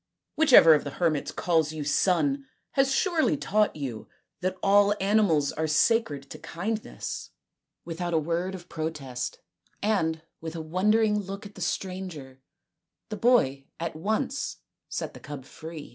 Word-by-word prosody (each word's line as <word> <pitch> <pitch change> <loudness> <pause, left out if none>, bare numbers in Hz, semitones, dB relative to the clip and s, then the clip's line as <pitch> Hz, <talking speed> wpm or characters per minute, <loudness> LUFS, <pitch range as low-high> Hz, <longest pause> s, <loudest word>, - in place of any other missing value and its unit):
Whichever 260 - +8
of 150 - +2
the 140 - -4
hermits 160 -5 0
calls 160 -4 +1
you 155 -1 -4
son 230 - +1 0.2
has 270 0 +2
surely 325 0 +2
taught 210 -4 +1
you 130 -7 -5 0.3
that 185 +1 -2
all 205 +1 +5
animals 195 -8 +3
are 160 +1 -2
sacred 155 - +2
to - - -8
kindness." 215 +6 -4 0.6
Without 175 +1 -3
a 165 - +2
word 170 +4 -1
of 175 -1 -11
protest 150 -7 -4 0.4
and 165 -7 0 0.2
with 160 0 -6
a - - -4
wondering 210 +6 +2
look 195 +1 -6
at 205 - -10
the - - -11
stranger 175 -9 -4 0.7
the 215 - -3
boy 195 - +3
at 165 -1 -3
once 220 - -2 0.3
set - - -4
the - - -11
cub 145 -3 -8
free. 160 +1 -9
175 Hz, 145 wpm, -27 LUFS, 155-210 Hz, 0.7 s, Whichever